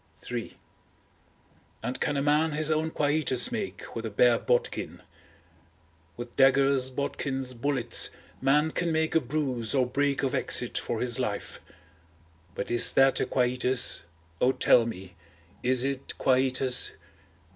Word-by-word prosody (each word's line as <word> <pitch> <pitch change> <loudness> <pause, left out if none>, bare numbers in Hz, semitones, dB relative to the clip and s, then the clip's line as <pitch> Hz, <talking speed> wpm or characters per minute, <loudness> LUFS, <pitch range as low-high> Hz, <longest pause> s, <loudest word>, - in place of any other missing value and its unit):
III 120 -2 -6 1.3
And 125 - -5
can 145 - -1
a 140 - -1
man 150 +2 +1
his 155 +1 -1
own 155 +1 0
quietus 145 - +2
make 215 -5 -6
with 115 - -5
a 110 - -4
bare 115 +3 +3
bodkin? 120 -1 -2 1.1
With 120 0 -9
daggers, 135 -1 +3
bodkins, 135 -1 -3
bullets, 125 -1 +2 0.3
man 150 +4 +2
can 170 0 -2
make 160 0 -1
a 160 - +3
bruise 130 -3 -2
or 130 -2 +2
break 140 +3 -1
of 135 - -1
exit - - +1
for - - -4
his 125 0 0
life; 105 -5 -4 1.0
but 100 - -5
is 120 - +3
that 135 0 +4
a - - -1
quietus, 125 0 +2 0.4
O 125 - +4
tell 120 -3 +3
me, 95 -5 -8 0.5
is 125 0 +1
it 135 -1 -4
quietus? 130 -1 +1
130 Hz, 135 wpm, -27 LUFS, 125-145 Hz, 1.3 s, that